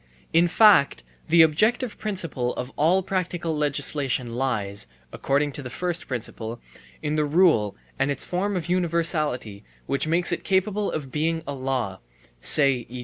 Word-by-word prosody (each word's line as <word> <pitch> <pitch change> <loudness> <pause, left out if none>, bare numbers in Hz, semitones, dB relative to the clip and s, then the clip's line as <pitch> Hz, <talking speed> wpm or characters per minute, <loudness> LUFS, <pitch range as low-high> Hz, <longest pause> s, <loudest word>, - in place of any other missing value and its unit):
In 170 +1 +5
fact 180 - +5 0.2
the 165 0 +6
objective 220 - +1
principle 165 - -2
of 125 +1 -5
all 175 +5 +2
practical 175 -3 -2
legislation 140 -4 -1
lies 105 - -2 0.3
(according 145 +1 0
to 145 - -5
the 130 - -7
first 175 +6 -3
principle) 115 -2 -5 0.4
in 150 0 -1
the 155 - +2
rule 150 - +3 0.2
and 135 - +1
its 140 -2 -2
form 190 +2 -1
of 175 - -4
universality 160 - 0 0.2
which 140 +3 -1
makes 170 +2 +2
it 170 - -2
capable 200 +2 0
of 140 -4 -5
being 160 +2 -1
a 140 - -4
law 130 -7 -3 0.4
(say, 135 - +3
e. 125 +1 -7
150 Hz, 150 wpm, -24 LUFS, 130-175 Hz, 0.4 s, the